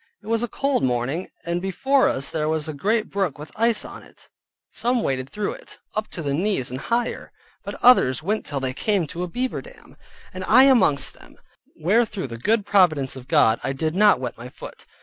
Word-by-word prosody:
It - - -18
was 225 +1 0
a 240 - -1
cold 275 +4 0
morning, 130 +7 -1 0.2
and 170 +1 -2
before 265 +9 +2
us 140 +1 -1
there 155 -1 -1
was 155 -1 -1
a 155 - -4
great 215 +9 -1
brook 195 -7 -1
with 150 +1 -10
ice 230 0 +1
on - - -10
it; - - -18 0.4
some 245 -1 0
waded 130 -1 -2
through 210 -1 -3
it, - - -12 0.2
up 215 0 -2
to 165 - -6
the 140 -1 -1
knees 175 - 0
and 130 - -5
higher, 235 0 -2 0.3
but - - -6
others 160 - +5
went 210 +5 -1
till 140 - -3
they 130 -1 -3
came 200 +4 0
to 165 +4 -7
a 180 - -2
beaver 250 +8 -3
dam, - - -16 0.4
and 185 0 -6
I 255 +6 +7
amongst 235 - +4
them, - - -18 0.4
where 205 +9 +2
through 205 - -5
the 115 0 -7
good 215 - +1
providence 165 -10 +3
of 130 -1 -11
God, 110 +1 +3
I 135 - -1
did 155 +3 -2
not 205 +3 +4
wet 125 -3 -5
my 120 +1 -8
foot. - - -12
180 Hz, 215 wpm, -23 LUFS, 140-220 Hz, 0.4 s, I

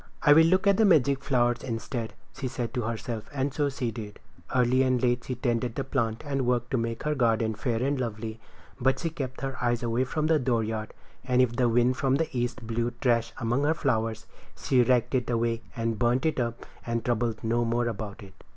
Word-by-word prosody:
"I 145 - +8
will 160 +2 +7
look 185 +3 +3
at 200 -1 +4
the 225 - +4
magic 140 -7 +4
flower 120 -3 +2
instead," 115 -1 -4 0.2
she 130 - -3
said 125 -2 -4
to 125 - -1
herself, 115 0 -4
and 140 -1 -1
so 145 -2 +1
she 130 -4 -3
did. 105 -2 -8 0.4
Early 125 +1 +3
and 130 -1 +2
late 120 0 +1
she 130 - -3
tended 120 -1 -1
the 135 - -1
plant 115 -4 -1
and 135 -2 -1
worked 120 -1 0
to 130 - +2
make 115 0 -3
her 150 - +1
garden 115 -4 +1
fair 115 +1 -1
and 140 0 0
lovely; 110 -1 -4 0.4
but 135 +1 +2
she 165 +2 -3
kept 135 -5 -5
her 135 -1 -4
eyes 120 -1 +1 0.3
from 155 +3 -1
the 155 -1 +3
dooryard. 110 -4 -1 0.3
And 125 -1 +1
if 125 -2 +3
the 125 -1 +2
wind 120 +2 +3
from 135 -1 +2
the 155 -1 -2
east 120 0 -2
blew 115 +1 -1
trash 115 -2 +1
among 120 +2 0
her 155 +2 +2
flowers 115 -6 -1 0.3
she 130 -2 +2
raked 120 +1 +2
it 125 -2 0
away 115 -1 0
and 115 -2 -2
burned 120 +4 +2
it 160 -4 +1
up 115 -1 -3 0.2
and 115 -1 -2
troubled 120 -2 -1
no 115 +1 +1
more 120 +1 0
about 105 -1 -5
it. 95 -1 -13
120 Hz, 215 wpm, -27 LUFS, 115-135 Hz, 0.4 s, I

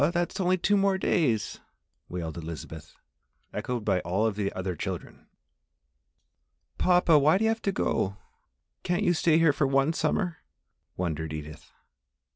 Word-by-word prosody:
That's 175 +3 -1
only 185 0 +2
two 195 +1 +2
days 140 - 0
more!" - - -33 0.5
wailed 80 -3 -4
Elizabeth, 80 -1 -8 0.6
echoed 120 -4 -3
by 95 -3 +2
all 95 +5 0
of 110 -3 0
the 100 -1 -1
other 95 -1 -3
children. - - -6 1.5
"Papa, 175 -4 +5
why 155 +5 +4
do 210 - -1
you 220 - +3
have 225 0 -3
to 200 - 0
go 100 - -1 0.6
can't 175 +3 0
you 175 -3 +3
stay 160 -1 +3
here 165 -3 +4
for 140 - +1
one 135 +3 +2
summer?" 175 0 -1 0.6
wondered 80 -3 -2
Edith. 75 0 -8
140 Hz, 145 wpm, -27 LUFS, -, 1.5 s, Papa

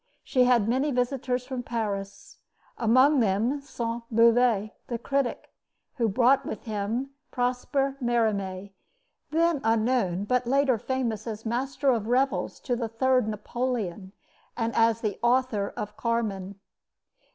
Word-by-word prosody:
She 255 -2 +3
had 240 -4 +3
many 260 +5 +1
visitors 250 -1 -1
from 255 -1 -4
Paris, 205 -5 -5 0.4
among 255 +5 +4
them 230 +6 +1
Sainte 235 -3 -4
Beuve, 230 -2 +4 0.2
the 240 - -2
critic, 275 +1 -2 0.4
who 230 -3 +2
brought 250 +6 +4
with 215 - -6
him 220 +5 -3 0.2
Prosper 265 +2 -1
Merimee, 200 -5 0 0.6
then 330 -2 +2
unknown, 225 -4 +1
but 250 +3 0
later 270 -2 +2
famous 245 -2 -2
as 220 0 -6
master 260 +4 0
of 225 -3 -1
revels 260 +3 0
to 245 - -1
the 230 -2 -3
third 255 +1 +2
Napoleon 210 -4 -3 0.5
and 230 -1 -1
as 230 0 +3
the 210 -4 -2
author 240 -4 +1
of 210 0 -5
Carmen. 205 -4 -2
235 Hz, 130 wpm, -27 LUFS, 215-255 Hz, 0.6 s, among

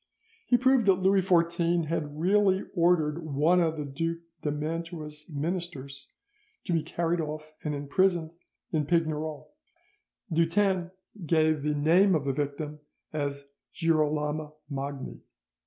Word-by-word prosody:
He 245 - +5
proved 260 -2 +3
that 195 - +8
Louis 190 +1 +3
XIV 170 -1 +2
had 150 -2 -3
really 195 +2 +3
ordered 170 -3 +2
one 155 +4 +3
of 160 -1 0
the 150 - -3
Duke 165 +4 -3 0.2
of 150 -1 -2
Mantua's 155 -1 -5
ministers 145 -3 -4 0.5
to 175 - -2
be 165 - +2
carried 165 +2 -1
off 155 0 -6
and 150 -1 -2
imprisoned 160 +3 +1 0.4
in 150 -3 0
Pignerol. 155 -2 -1 0.8
Dutens 175 +2 +2 0.3
gave 155 -2 +2
the 150 +1 0
name 175 +6 +4
of 145 -3 -1
the 135 - 0
victim 145 +2 -3 0.3
as 140 -2 -3 0.3
Girolamo 155 -2 0 0.2
Magni. 140 0 -5
160 Hz, 125 wpm, -28 LUFS, 150-175 Hz, 0.8 s, that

